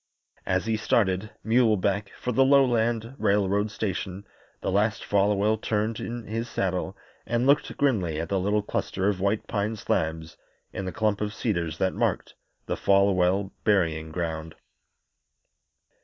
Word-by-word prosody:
As 90 Hz, +2 st, +1 dB
he 110 Hz, -1 st, 0 dB
started, 105 Hz, -2 st, +1 dB
muleback, 105 Hz, -4 st, +2 dB
for 125 Hz, -, -2 dB
the 135 Hz, +3 st, +4 dB
lowland 120 Hz, -4 st, +3 dB
railroad 100 Hz, +1 st, +2 dB
station 100 Hz, -2 st, -4 dB, 0.4 s
the -, -, -1 dB
last 105 Hz, +3 st, +1 dB
Folwell 105 Hz, +2 st, +2 dB
turned 110 Hz, +1 st, -1 dB
in 120 Hz, -1 st, -5 dB
his 115 Hz, +2 st, -4 dB
saddle 95 Hz, +1 st, -2 dB, 0.3 s
and 120 Hz, +1 st, +1 dB
looked 140 Hz, +2 st, +2 dB
grimly 95 Hz, -, +1 dB
at 85 Hz, 0 st, -4 dB
the 100 Hz, -, +1 dB
little 105 Hz, +2 st, +1 dB
cluster 95 Hz, -1 st, -2 dB
of 100 Hz, -3 st, -1 dB
white 100 Hz, +2 st, 0 dB
pine 105 Hz, +1 st, -2 dB
slabs 80 Hz, -5 st, -2 dB, 0.4 s
in 95 Hz, -, -4 dB
the 95 Hz, -, -3 dB
clump 105 Hz, -1 st, 0 dB
of 105 Hz, 0 st, -2 dB
cedars 85 Hz, -8 st, -2 dB
that 95 Hz, +1 st, 0 dB
marked -, -, -1 dB, 0.3 s
the -, -, -2 dB
Folwell 95 Hz, 0 st, +2 dB
burying 80 Hz, -7 st, +1 dB
ground. 80 Hz, -1 st, -4 dB
100 Hz, 140 wpm, -26 LUFS, 95-110 Hz, 0.4 s, the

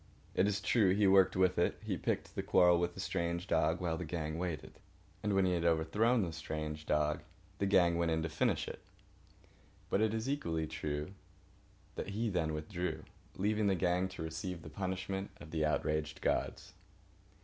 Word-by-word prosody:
It 95 Hz, -, +3 dB
is 100 Hz, -1 st, 0 dB
true, 100 Hz, -3 st, +3 dB
he 105 Hz, 0 st, +3 dB
worked 95 Hz, -1 st, +5 dB
with 95 Hz, -1 st, +3 dB
it. 85 Hz, -, +2 dB
He -, -, -1 dB
picked -, -, -2 dB
the -, -, -2 dB
quarrel 90 Hz, -1 st, +5 dB
with 85 Hz, 0 st, -1 dB
the -, -, -9 dB
strange 85 Hz, -2 st, -1 dB
dog 80 Hz, -2 st, +2 dB
while 85 Hz, -3 st, -1 dB
the -, -, -3 dB
gang 80 Hz, -1 st, -3 dB
waited. 85 Hz, -5 st, -4 dB, 0.4 s
And 105 Hz, -1 st, 0 dB
when 95 Hz, -1 st, +4 dB
he 90 Hz, -, +2 dB
had 85 Hz, -1 st, 0 dB
overthrown 90 Hz, +9 st, +3 dB
the 85 Hz, -3 st, -3 dB
strange 75 Hz, -1 st, -5 dB
dog 75 Hz, 0 st, +1 dB, 0.4 s
the 100 Hz, -, +1 dB
gang 85 Hz, -3 st, +4 dB
went 85 Hz, -1 st, +2 dB
in 80 Hz, 0 st, +1 dB
to -, -, 0 dB
finish 80 Hz, -, 0 dB
it. -, -, -6 dB, 1.1 s
But 100 Hz, -, +3 dB
it 110 Hz, -1 st, +3 dB
is 110 Hz, +2 st, -2 dB
equally 85 Hz, -, -1 dB
true 75 Hz, 0 st, -4 dB, 0.8 s
that -, -, -5 dB
he 115 Hz, -1 st, 0 dB
then 80 Hz, -4 st, 0 dB
withdrew, 85 Hz, +4 st, -3 dB, 0.3 s
leaving 105 Hz, +2 st, +1 dB
the 95 Hz, -, +3 dB
gang 90 Hz, +1 st, +1 dB
to 95 Hz, -3 st, -7 dB
receive 80 Hz, +2 st, -5 dB
the -, -, -8 dB
punishment 95 Hz, +2 st, -3 dB
of 80 Hz, -, -11 dB
the 80 Hz, -1 st, 0 dB
outraged 75 Hz, 0 st, -1 dB
gods. -, -, -1 dB
90 Hz, 185 wpm, -34 LUFS, 80-95 Hz, 1.1 s, worked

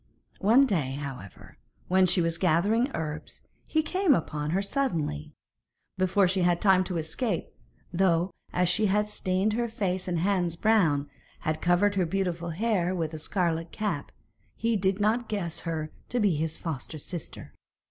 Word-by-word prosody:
One 235 Hz, +8 st, +5 dB
day, 155 Hz, -, 0 dB
however, 135 Hz, -, -8 dB, 0.3 s
when 185 Hz, 0 st, +4 dB
she 180 Hz, 0 st, +3 dB
was 165 Hz, 0 st, -1 dB
gathering 200 Hz, -, +2 dB
herbs, 155 Hz, -2 st, -6 dB, 0.3 s
he 315 Hz, 0 st, +2 dB
came 370 Hz, -2 st, +3 dB
upon 150 Hz, -4 st, -3 dB
her 185 Hz, +5 st, +1 dB
suddenly, 170 Hz, -, -2 dB, 0.6 s
before 185 Hz, +1 st, +3 dB
she 190 Hz, +1 st, +1 dB
had 175 Hz, -1 st, +3 dB
time 190 Hz, -1 st, +4 dB
to 180 Hz, -2 st, -3 dB
escape, 165 Hz, +5 st, -2 dB, 0.4 s
though 175 Hz, 0 st, +2 dB, 0.2 s
as 180 Hz, 0 st, +1 dB
she 210 Hz, +5 st, +3 dB
had 210 Hz, +2 st, +1 dB
stained 190 Hz, +2 st, 0 dB
her 235 Hz, +1 st, 0 dB
face 190 Hz, -5 st, -2 dB
and 175 Hz, -1 st, 0 dB
hands 175 Hz, -1 st, +1 dB
brown, 165 Hz, -8 st, +2 dB, 0.4 s
and 155 Hz, -1 st, -1 dB
covered 175 Hz, +4 st, +3 dB
her 185 Hz, -3 st, +1 dB
beautiful 175 Hz, -2 st, -2 dB
hair 185 Hz, 0 st, 0 dB
with 160 Hz, -3 st, -2 dB
a 155 Hz, -, -5 dB
scarlet 165 Hz, -1 st, -1 dB
cap, 215 Hz, -1 st, -3 dB, 0.4 s
he 230 Hz, 0 st, 0 dB
did 190 Hz, 0 st, +1 dB
not 220 Hz, +3 st, +1 dB
guess 180 Hz, -6 st, -2 dB
her 160 Hz, -2 st, -3 dB, 0.2 s
to 245 Hz, -, 0 dB
be 205 Hz, -5 st, +3 dB
his 160 Hz, +1 st, -1 dB
foster 155 Hz, -1 st, -5 dB
sister. 170 Hz, +2 st, -8 dB
180 Hz, 160 wpm, -28 LUFS, 165-205 Hz, 0.6 s, One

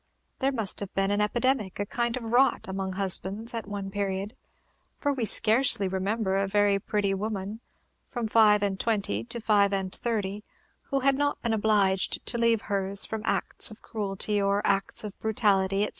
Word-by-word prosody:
There 270 Hz, 0 st, +1 dB
must 225 Hz, -7 st, +2 dB
have 200 Hz, -2 st, -6 dB
been 195 Hz, 0 st, +1 dB
an 205 Hz, +1 st, 0 dB
epidemic, 225 Hz, -2 st, 0 dB
a 205 Hz, -, -1 dB
kind 235 Hz, +3 st, -2 dB
of 250 Hz, -, -7 dB
rot, 245 Hz, +4 st, +1 dB
among 190 Hz, 0 st, -4 dB
husbands 195 Hz, +4 st, +1 dB
at 225 Hz, -3 st, -5 dB
one 200 Hz, -1 st, -6 dB
period; 200 Hz, +1 st, -4 dB, 0.6 s
for 285 Hz, -1 st, -1 dB
we 250 Hz, -4 st, -2 dB
scarcely 220 Hz, -2 st, +4 dB
remember 190 Hz, +2 st, -2 dB
a 195 Hz, 0 st, 0 dB
very 205 Hz, 0 st, +2 dB
pretty 200 Hz, 0 st, -1 dB
woman, 205 Hz, +1 st, -5 dB, 0.5 s
from 240 Hz, -3 st, -4 dB
five 210 Hz, -2 st, +4 dB
and 195 Hz, -1 st, -2 dB
twenty 200 Hz, -, -1 dB
to 235 Hz, -, -5 dB
five 205 Hz, -3 st, +2 dB
and 190 Hz, -1 st, -2 dB
thirty, 210 Hz, -3 st, -4 dB, 0.5 s
who 275 Hz, -1 st, -1 dB
had 275 Hz, +1 st, +3 dB
not 285 Hz, +1 st, -1 dB
been 230 Hz, -2 st, 0 dB
obliged 205 Hz, -3 st, +1 dB
to 235 Hz, -, 0 dB
leave 230 Hz, -2 st, +2 dB
hers 200 Hz, -1 st, +1 dB
from 220 Hz, -1 st, -5 dB
acts -, -, +3 dB
of 215 Hz, -, -14 dB
cruelty 205 Hz, -1 st, -2 dB
or 200 Hz, +1 st, 0 dB
acts 195 Hz, +1 st, +1 dB
of 210 Hz, -2 st, -7 dB
brutality, 200 Hz, -3 st, +1 dB
etc. 210 Hz, -, -1 dB
205 Hz, 180 wpm, -26 LUFS, 195-225 Hz, 0.6 s, scarcely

